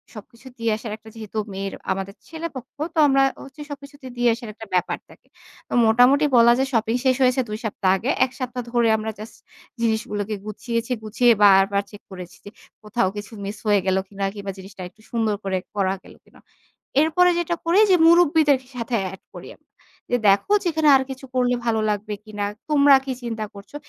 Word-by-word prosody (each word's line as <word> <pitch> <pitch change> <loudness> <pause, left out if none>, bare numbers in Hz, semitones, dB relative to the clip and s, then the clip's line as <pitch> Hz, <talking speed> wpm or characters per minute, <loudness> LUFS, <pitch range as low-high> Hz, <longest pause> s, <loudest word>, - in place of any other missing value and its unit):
সবকিছু 235 +5 -13
দিয়ে 230 -1 0
আসার 220 -1 -7
একটা 220 0 -15
যেহেতু 220 -1 -8 0.2
মেয়ের 195 0 -4 0.2
আমাদের 195 +1 -4
ছেলেপক্ষ, 320 -6 -7 0.2
তো - - +1
আমরা 270 -1 +3 0.2
হচ্ছে 275 +2 -12
সবকিছু 280 0 -9
তো - - -7
দিয়ে 245 0 +3
আসার 235 -2 -9
একটা 225 - -10
ব্যাপার 180 -1 0
থাকে। - - -19 0.4
তো - - -8
মোটামুটি 250 +6 +5
বলা 235 0 +7
যায় 265 +1 +1
শপিং 225 0 +1
শেষ 255 - +4
হয়েছে 255 +1 +3
২ 215 - -3
সপ্তাহ 200 -3 0
আগে। 235 +7 -3 0.2
১ 255 - -10
সপ্তাহ 250 -1 -4
ধরে 240 -1 +2
আমরা 220 0 -4
জাস্ট 220 +2 -9 0.5
জিনিসগুলোকে 220 -2 -1
গুছিয়েছি। 230 +3 -4
গুছিয়ে 235 +3 +3
বারবার 200 0 +5
চেক 205 - -12
করেছি 180 -2 -10
যে - - -8 0.3
কোথাও 210 -1 0
কিছু 205 +2 -8
মিস 205 +2 -5
হয়ে 205 -1 +4
গেলো 190 0 +2
কিনা। 195 0 -4
কিংবা 200 -1 -5
জিনিসটা 190 0 -11
একটু 215 +4 -26
সুন্দর 225 -3 0
করে 190 -1 -1 0.2
করা 190 -2 +1
গেলো - - -16
কিনা। - - -21 0.6
এরপরে 320 +3 +4
যেটা 345 0 -1
করি 340 +4 +3
যে 365 - +7
মুরুব্বিদের 320 -5 +5 0.2
সাথে 235 0 -3 0.2
এড 190 - -11
করি - - -10
আমরা। - - -45 0.4
যে 245 - +2
দেখো 200 - +3
যে - - -1
এখানে 315 -1 +2
আর 265 - +3
কিছু 265 +1 -8
করলে 250 -1 +2
ভালো 225 -2 +1
লাগবে 210 0 -2
কিনা? 210 -1 -4 0.2
তোমরা 285 -2 +6
কি 270 - -3
চিন্তা 225 -2 -3
করছো? 200 +7 -13
225 Hz, 195 wpm, -22 LUFS, 205-265 Hz, 0.6 s, বলা